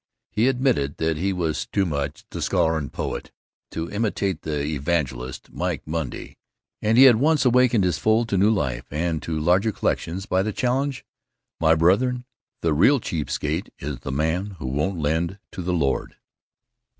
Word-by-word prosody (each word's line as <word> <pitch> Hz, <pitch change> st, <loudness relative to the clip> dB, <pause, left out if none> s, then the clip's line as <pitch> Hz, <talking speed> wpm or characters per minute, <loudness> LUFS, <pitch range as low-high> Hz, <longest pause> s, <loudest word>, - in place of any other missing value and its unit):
He 110 Hz, +4 st, +2 dB
admitted 125 Hz, -, +1 dB
that 80 Hz, -1 st, 0 dB
he 95 Hz, +5 st, 0 dB
was 85 Hz, -4 st, -2 dB
too 100 Hz, -, +1 dB
much 70 Hz, -2 st, -3 dB
the -, -, -5 dB
scholar 80 Hz, 0 st, +2 dB
and 75 Hz, -3 st, -3 dB
poet -, -, -4 dB, 0.4 s
to 80 Hz, +1 st, -4 dB
imitate 100 Hz, -5 st, -1 dB
the 75 Hz, -2 st, -2 dB
evangelist, 70 Hz, -4 st, -2 dB
Mike -, -, -2 dB
Monday, 80 Hz, -4 st, -5 dB, 0.4 s
yet 110 Hz, +2 st, +2 dB
he 130 Hz, -, +9 dB
had 125 Hz, -4 st, +8 dB
once 150 Hz, +3 st, +3 dB
awakened 125 Hz, -3 st, +4 dB
his 90 Hz, -6 st, +1 dB
fold 110 Hz, +5 st, +2 dB
to 100 Hz, -, +1 dB
new 100 Hz, +3 st, +5 dB
life, 75 Hz, -, -1 dB
and 80 Hz, +1 st, -1 dB
to 80 Hz, -1 st, -3 dB
larger 90 Hz, +7 st, +3 dB
collections, 95 Hz, -1 st, -2 dB
by 95 Hz, -2 st, +1 dB
the 105 Hz, +2 st, -1 dB
challenge, 130 Hz, +4 st, -1 dB, 0.5 s
"My 80 Hz, 0 st, +4 dB
brethren, 125 Hz, +10 st, +2 dB, 0.4 s
the 80 Hz, -2 st, +2 dB
real 130 Hz, -, +5 dB
cheap 80 Hz, -8 st, -3 dB
skate -, -, -2 dB
is 70 Hz, -2 st, -5 dB
the 70 Hz, -, -5 dB
man 85 Hz, +8 st, -1 dB
who 65 Hz, -, -7 dB
won't 75 Hz, +9 st, -1 dB
lend 80 Hz, +5 st, -1 dB
to 95 Hz, -, -6 dB
the 90 Hz, +1 st, -2 dB
Lord!" 70 Hz, -6 st, 0 dB
85 Hz, 175 wpm, -24 LUFS, 75-110 Hz, 0.5 s, he